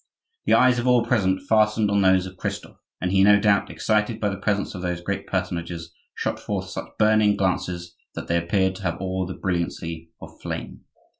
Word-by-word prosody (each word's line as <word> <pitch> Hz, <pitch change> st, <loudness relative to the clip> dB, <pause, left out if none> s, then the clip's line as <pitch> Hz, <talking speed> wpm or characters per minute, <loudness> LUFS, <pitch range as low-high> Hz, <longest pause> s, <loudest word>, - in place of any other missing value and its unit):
The -, -, +5 dB
eyes 125 Hz, -1 st, +4 dB
of 120 Hz, -, -2 dB
all 125 Hz, -2 st, +4 dB
present 95 Hz, -6 st, +1 dB
fastened 105 Hz, -1 st, +3 dB
on 100 Hz, 0 st, +3 dB
those 95 Hz, -1 st, +4 dB
of 95 Hz, 0 st, -9 dB
Christophe, -, -, -6 dB, 0.2 s
and 90 Hz, +1 st, -1 dB
he, 95 Hz, 0 st, +4 dB
no 100 Hz, 0 st, +6 dB
doubt 100 Hz, -1 st, +2 dB
excited 110 Hz, +1 st, 0 dB
by 105 Hz, -, 0 dB
the 100 Hz, -, -4 dB
presence 100 Hz, 0 st, -1 dB
of 90 Hz, -, -6 dB
those 90 Hz, -1 st, -2 dB
great 85 Hz, -, -4 dB
personages, 85 Hz, -1 st, -3 dB, 0.2 s
shot -, -, -2 dB
forth 95 Hz, -2 st, -4 dB
such -, -, -7 dB
burning 110 Hz, -1 st, +4 dB
glances 90 Hz, -2 st, -2 dB, 0.2 s
that -, -, -6 dB
they 85 Hz, -, +2 dB
appeared 95 Hz, +2 st, +1 dB
to -, -, -11 dB
have 90 Hz, -3 st, -2 dB
all 95 Hz, -1 st, -2 dB
the 95 Hz, -, -6 dB
brilliancy 85 Hz, -2 st, -3 dB
of -, -, -13 dB
flame. -, -, -6 dB
95 Hz, 200 wpm, -24 LUFS, 90-105 Hz, 0.2 s, no